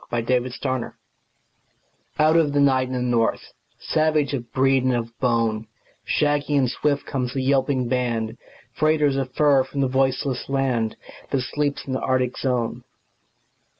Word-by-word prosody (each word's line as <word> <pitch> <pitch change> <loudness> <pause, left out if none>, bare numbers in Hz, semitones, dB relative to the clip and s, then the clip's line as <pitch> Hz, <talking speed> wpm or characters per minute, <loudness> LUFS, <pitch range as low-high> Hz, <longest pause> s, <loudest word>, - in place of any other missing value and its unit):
THE 120 -1 -1
TRAIN 125 +1 0 0.3
DOGS - - -8 1.2
Out 155 +1 +4
of 155 -4 +3
the 145 - +2
night 130 -2 +3
and 130 - -4
the 125 - -1
north; 120 -2 0 0.2
Savage 155 -2 +1
of 120 -4 -4
breed 135 0 +2
and 130 -1 +2
of 115 -1 -4
bone, 115 -3 0 0.4
Shaggy 145 -1 +1
and 130 -2 +3
swift 145 +3 -1
comes 125 -2 -3
the 135 - -1
yelping 130 -1 +1
band, 120 -3 -1 0.3
Freighters 150 -2 +2
of 135 -1 -2
fur 145 -3 +4
from 140 +1 -4
the 135 - +2
voiceless 130 0 0
land 130 -5 0 0.3
That 135 - 0
sleeps 145 +2 -2
in 135 - -4
the 130 - -1
Arctic 130 -1 0
zone. 125 -2 -1
130 Hz, 155 wpm, -23 LUFS, 125-140 Hz, 1.2 s, Out